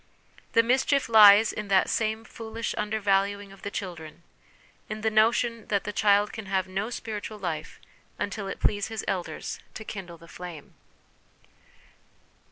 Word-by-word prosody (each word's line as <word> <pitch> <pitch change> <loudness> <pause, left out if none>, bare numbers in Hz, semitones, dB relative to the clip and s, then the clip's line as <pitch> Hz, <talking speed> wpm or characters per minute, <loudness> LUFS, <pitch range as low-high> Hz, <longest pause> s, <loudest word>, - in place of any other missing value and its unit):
The 230 - +5
mischief 265 +3 +2
lies 215 -1 +8
in 210 - -5
that 195 -1 +4
same 220 0 -1
foolish 225 0 -5
undervaluing 200 -1 0
of 195 - -15
the 200 - -4
children, 170 -5 -7 0.7
in 215 0 -5
the 220 0 +1
notion 230 +1 +2
that 200 -2 0
the 210 - -5
child 205 0 +3
can 220 -3 -7
have 190 -1 0
no 195 +4 -3
spiritual 215 -2 -5
life 165 -6 -5 0.4
until 200 0 -3
it 195 - -5
please 205 -1 +1
his 220 -2 -5
ciders 180 -3 -3 0.2
to 220 - -7
kindle 180 -5 -7
the 170 +1 -16
flame. 175 -4 -10
205 Hz, 150 wpm, -27 LUFS, 195-220 Hz, 0.7 s, lies